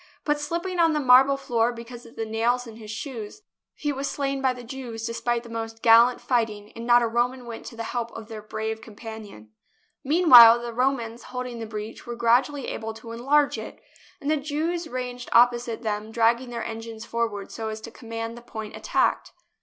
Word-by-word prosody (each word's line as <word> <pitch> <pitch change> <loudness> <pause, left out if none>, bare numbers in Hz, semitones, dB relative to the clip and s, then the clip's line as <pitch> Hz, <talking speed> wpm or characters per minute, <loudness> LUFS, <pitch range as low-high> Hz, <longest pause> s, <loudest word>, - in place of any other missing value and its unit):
But, 295 -1 +1
slipping 345 +4 -3
on 330 -1 +4
the 300 - +1
marble 265 +1 +6
floor 235 -3 +1
because 235 0 -10
of 230 - -17
the 225 - -3
nails 235 +3 0
in 225 -2 -11
his 215 -2 -11
shoes, 230 - -7 0.3
he 295 - -2
was 275 +1 -3
slain 275 -1 -2
by 260 -1 +3
the 250 -1 -8
Jews, 235 -2 -6
despite 235 0 -1
the 235 - -12
most 225 0 -6
gallant 235 +2 +6
fighting, 220 -4 -1
and 230 +1 -8
not 240 0 +6
a - - +2
Roman 245 +2 -1
went 230 -1 -8
to - - -9
the 230 - -5
help 235 0 -3
of 225 -2 -8
their 220 -2 -7
brave 220 +1 -4
champion. 215 - -10 0.5
Meanwhile 260 -7 +9
the 240 0 -6
Romans 240 -2 -1
holding 250 -2 -5
the 225 - -5
breach 215 +1 -7
were 240 - -4
gradually 245 +4 +2
able 225 0 -5
to 230 +1 -10
enlarge 275 +5 +2
it, - - -9 0.4
and 290 0 -1
the 310 - +3
Jews 315 +4 -2
ranged 250 -2 -5
opposite 240 -1 +3
them 215 0 -3
dragged 235 +2 +2
their 235 - -4
engines 225 0 -7
forward 225 -4 -3
so 220 -1 -4
as 215 0 -5
to 230 - -9
command 230 0 -6
the 240 - -11
point 220 -2 -8
attacked. - - 0
235 Hz, 200 wpm, -25 LUFS, 225-255 Hz, 0.5 s, Meanwhile